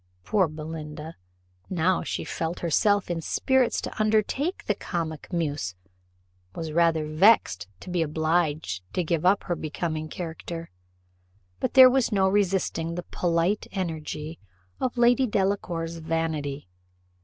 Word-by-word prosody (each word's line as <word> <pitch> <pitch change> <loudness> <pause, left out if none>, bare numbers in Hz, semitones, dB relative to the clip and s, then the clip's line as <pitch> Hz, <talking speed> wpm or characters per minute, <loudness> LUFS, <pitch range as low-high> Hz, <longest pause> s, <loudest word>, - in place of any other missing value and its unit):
Poor 190 - +2
Belinda, 155 0 -7 0.5
now 180 0 +2
that - - -6
she - - -2
felt 165 +1 -3
herself 185 +3 +2
in 165 -1 -2
spirits 260 +8 +2
to - - -4
undertake 220 - +1
the 210 - +2
comic 165 -5 -4
muse, 145 - -2 0.8
was 160 -1 -4
rather 165 -1 +3
vexed 155 - +4
to - - -9
be 175 -1 +1
obliged 155 - 0
to 180 - 0
give 165 +1 +1
up 195 +2 +4
her 175 - -1
becoming 155 0 -3
character; 165 - -6 0.9
but - - -2
there 260 -1 +11
was 255 -1 +2
no 195 -2 +3
resisting 190 -4 0
the 175 - -4
polite 175 +3 +1
energy 160 -3 -4 0.4
of 255 -1 -2
Lady 245 +2 +4
Delacour's 185 -5 -1
vanity. 160 - -2
170 Hz, 130 wpm, -26 LUFS, 155-195 Hz, 0.9 s, there